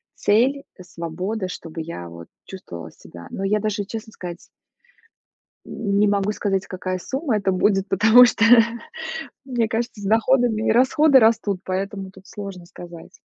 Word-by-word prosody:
цель, 260 +7 +2
э, 185 - -11
свобода, 180 +4 -4
чтобы 165 -2 -7
я 120 - -7
вот 85 0 -11 0.2
чувствовала 85 - -9
себя. 85 0 -13
Но 195 - -5
я 210 +2 +1
даже, 205 -1 -2
честно 220 +1 -7
сказать 175 -1 -9 1.2
М, 200 -2 -2
не 210 - +4
могу 200 0 +1
сказать, 195 -2 -1
какая 185 0 -4
сумма 265 - -2
это 195 -1 0
будет, 195 +1 +1
потому 220 +6 +7
что 225 -1 +1 1.0
мне 240 -4 -1
кажется, 230 0 -3
с - - -8
доходами 225 +1 +2
и - - +4
расходы 265 +4 +5
растут, 215 -4 +2
поэтому 195 +1 -4
тут 190 0 -17
сложно 195 -4 -8
сказать. 175 0 -12
200 Hz, 155 wpm, -22 LUFS, 185-225 Hz, 1.2 s, потому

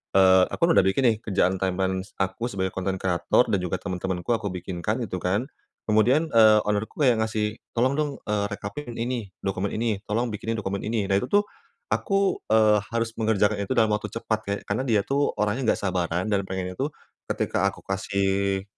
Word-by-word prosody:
eee, 95 -1 +7
aku - - -7
udah 95 - +5
bikin 95 +8 +2
nih - - -1
kerjaan 95 -2 +1
timeline 95 0 0 0.2
aku 95 +5 -3
sebagai 95 -5 -2
konten 95 0 -2
kreator 90 +5 +2
dan 100 - +3
juga 90 -1 -2
temen-temanku 95 -1 -3
aku 110 -3 0
bikinkan 95 +5 -3
gitu 90 -3 -4
kan, 95 +7 0 0.4
kemudian, 125 +9 +3
eee, 110 -2 +6
owner-ku 105 +7 -1
yang 120 -4 +4
ngasih, 110 -1 -1 0.2
"Tolong 125 +3 +3
dong," 150 -1 0
eee, 105 -1 0
"rekapin 105 +5 -6
ini, 120 -2 -3 0.2
dokumen 95 0 -2
ini." 110 -3 0
"Tolong 115 +2 0
bikinin 110 +2 -3
dokumen 100 -2 -3
ini," 110 -2 0
nah 95 0 +2
itu 125 - -4
tuh, 205 0 +3 0.5
aku, 195 -1 +1
eee, 110 -1 +5
harus 115 0 0
mengerjakan 105 -1 +2
itu 100 - -2
dalam 110 -2 +4
waktu 105 0 -1
cepat 110 -1 -1
ke - - -1
karena 105 +6 -1
dia 110 -3 +3
tuh 140 +1 +1
orangnya 105 +5 0
enggak - - -6
sabaran 90 -2 -1
dan 100 - +2
pengennya 95 -1 -3
tuh, 135 - +1 0.4
ketika - - 0
aku - - -13
kasih, 95 0 0
105 Hz, 185 wpm, -25 LUFS, 95-115 Hz, 0.5 s, eee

